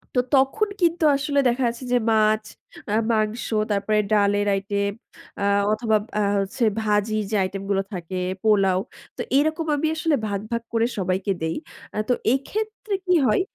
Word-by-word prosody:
তো - - +4
তখন 275 +11 +3
কিন্তু 340 -1 +2
আসলে 285 0 0
দেখা 245 +2 +1
যাচ্ছে 235 +2 -4
যে - - +5
মাছ, 215 0 +3 0.5
আ - - 0 0.2
মাংস, 215 +1 0 0.3
তারপরে 205 +1 +1
ডালের 205 -1 +3
আইটেম 200 +1 -1 0.5
আ - - -2 0.3
অথবা 220 0 +1 0.2
আ - - +2 0.2
হচ্ছে 200 +5 -2 0.2
ভাজির 215 0 +1
যে - - +1
আইটেম 195 +1 -4
গুলো 195 -1 +2
থাকে, 180 0 -5 0.3
পোলাও। 195 -4 +3 0.4
তো - - -3 0.2
এরকম 315 +3 +1
আমি 290 +2 0
আসলে 320 -1 +1
ভাগ, 200 -1 -2
ভাগ, 235 0 -1
করে 230 0 +3
সবাইকে 185 +1 -1
দেই। 160 0 -1 0.4
আ - - -4
তো - - +5 0.2
এক্ষেত্রে 425 +9 -3
কি 365 - +3
হয় 215 - +3
215 Hz, 165 wpm, -23 LUFS, 200-270 Hz, 0.5 s, যে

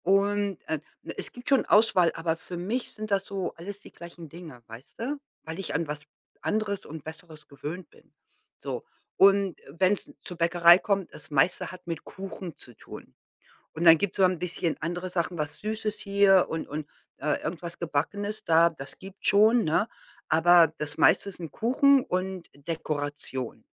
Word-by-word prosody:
Und, 200 0 +2
äh, 160 - -1 0.2
ne, - - -6
es - - -2
gibt 245 +2 -7
schon 275 -2 +4
Auswahl, 200 -5 +4
aber 165 0 -1
für 175 +2 -8
mich 215 +8 -2
sind 215 -1 -7
das 195 -1 +1
so 195 -2 -4
alles 200 +4 -8
die - - -13
gleichen 170 -1 -11
Dinge, 155 -7 -11
weißt 115 +4 -13
du, 275 +6 -3 0.2
weil 160 +2 -7
ich 195 - -4
an 160 +1 0
was 150 0 -4 0.4
anderes 210 -2 -1
und 155 -1 -9
Besseres 160 -1 -10
gewöhnt 155 +6 -7
bin. - - -23 0.5
So, - - -5 0.3
und 195 -2 +4
wenn's 185 +7 0
zur 180 - -8
Bäckerei 170 +1 +6
kommt, 195 -3 -1
das 150 0 -11
meiste 145 +4 +2
hat 185 - -12
mit 165 -2 -5
Kuchen 190 -3 -8
zu 120 - -10
tun - - -12 0.6
und 165 +2 -3
dann 165 -1 +9
gibt's 200 +2 -2
so 195 - +4
'n 185 -2 +3
bisschen 175 -1 -1
andere 175 +3 -3
Sachen, 175 0 -2
was 150 -2 -2
Süßes 215 0 -2
hier 200 -2 +4
und 160 - -4
und, 150 +1 -5 0.4
äh, 150 0 0
irgendwas 170 0 -5
Gebackenes 205 +7 -2
da, 165 +1 +5
das 135 -5 -8
gibt's 195 +1 -7
schon, 220 +3 +5
ne? 165 +8 +1 0.4
Aber 165 0 +6
das 145 -1 +2
meiste 200 - +4
sind 170 -4 -8
Kuchen 265 +3 +4
und 185 - -3
Dekoration, 145 -4 -4
175 Hz, 175 wpm, -27 LUFS, 160-200 Hz, 0.6 s, dann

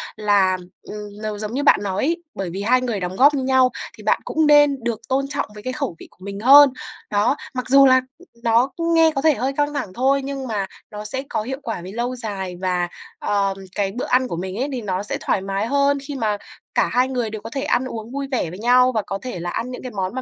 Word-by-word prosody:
là, 200 -3 +3 0.3
ừm, 210 0 -8 0.3
n - - -9
giống 215 +1 -4
như 280 +3 -1
bạn - - +6
nói 190 -2 -1
ấy, 340 +3 -1
bởi 195 -2 -3
vì 190 +4 -5
hai 250 +5 +3
người 235 -5 -2
đóng 180 0 -4
góp 280 +7 +6
như 275 -2 -1
nhau 260 -1 +4 0.3
thì - - -12
bạn - - +2
cũng 315 -1 +1
nên 290 -3 +5
được 235 -2 -2
tôn 270 +1 +1
trọng 280 -3 -2
với 210 0 -11
cái 255 - -3
khẩu 265 - -3
vị - - -11
của 185 - -15
mình 200 0 -5
hơn. 280 +5 +8 0.4
Đó, 205 +6 +2 0.2
mặc 255 -1 -3
dù 275 +1 +7
là 260 -1 +6 0.4
nó 235 +3 +3 0.3
nghe 325 -1 +5
có 275 - 0
vẻ 315 +1 +5
hơi 260 +5 -1
căng 290 0 +1
thẳng 245 -10 -4
thôi 270 +4 +2
nhưng 270 -1 -4
mà 210 -4 -1 0.3
nó 210 0 -7
sẽ 260 +5 -3
có - - -1
hiệu 265 +5 -5
quả 225 -6 -4
về 180 +2 -8
lâu 240 +4 -2
dài 200 -6 -5
và, 180 -2 0 0.3
ờm, 200 -1 0 0.2
cái 200 -2 0
bữa 245 +5 -4
ăn 255 +1 +2
của 170 - -4
mình 185 +2 -4
ấy 265 +5 -1
thì 255 -3 -3
nó 190 -2 -2
sẽ 205 - -3
thoải - - 0
mái 195 +2 -2
hơn 280 +2 +2
khi 290 - -5
mà 215 -5 0 0.4
cả - - +3
hai 250 +1 +3
người 250 -4 -2
đều 215 -1 -6
có 225 - -7
thể 270 +3 -3
ăn 255 - +1
uống 230 -2 -6
vui 275 +1 -3
vẻ 240 -10 0
với 180 +4 -9
nhau 250 +2 +4
và 220 - +2
có 195 - -3
thể 250 -8 -5
là 175 +1 -4
ăn 235 +7 -3
những 250 - -7
cái 255 - -6
món 190 0 -3
mà 260 - -2
240 Hz, 265 wpm, -21 LUFS, 200-270 Hz, 0.4 s, hơn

